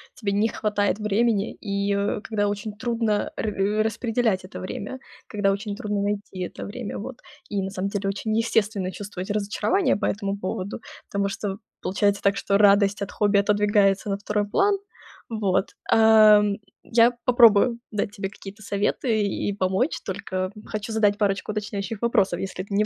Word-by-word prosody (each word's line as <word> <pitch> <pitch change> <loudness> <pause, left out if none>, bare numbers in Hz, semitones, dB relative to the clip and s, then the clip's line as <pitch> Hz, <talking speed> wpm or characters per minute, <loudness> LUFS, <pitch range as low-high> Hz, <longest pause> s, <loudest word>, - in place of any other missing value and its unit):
тебе 205 -4 -2
не 205 +3 +2
хватает 210 -1 0
времени 210 0 +1
и, 200 -1 -2
а, 205 +2 -1
когда 205 -2 -1
очень 205 +1 -3
трудно 230 -3 0
ра 210 0 0
распределять 225 -3 0
это 190 - -9
время, 205 +7 -6 0.3
когда 205 -2 +1
очень 200 +1 -3
трудно 205 -1 -2
найти 200 -2 -3
это 180 - -5
время. 215 +1 -6
Вот. 235 +4 -7 0.3
И 200 -2 -1
на 190 - -3
самом 195 0 -3
деле 200 -1 -2
очень 215 +2 -2
естественно 210 -4 0
чувствовать 195 -2 -7
разочарование 210 - +1
по - - -2
этому 200 -1 -2
поводу. 190 +2 -4 0.3
Потому 200 0 0
что 195 0 -4 0.2
получается 200 +1 +1
так, 200 0 +3
что 200 - +1
радость 200 -1 +4
от 200 - -3
хобби 205 -1 +2
отодвигается 205 0 +2
на 195 - 0
2 205 0 -1
план. 400 - +3 0.5
Вот, 205 -3 0 0.2
ам, 215 -2 +6 0.3
я 235 +1 +4
попробую 235 -1 +5
дать 205 -1 -2
тебе 195 -1 -4
какие-то 200 +1 -11
советы 210 +3 0
и 200 +1 -1
помочь, 190 - 0
только 185 -1 -3
хочу 215 +1 -5
задать 205 -2 +3
парочку 200 0 0
уточняющих 205 0 -4
вопросов, 205 -7 +2
если 190 -1 -4
ты 200 - -8
не 210 +1 +3
205 Hz, 165 wpm, -24 LUFS, 200-215 Hz, 0.5 s, ам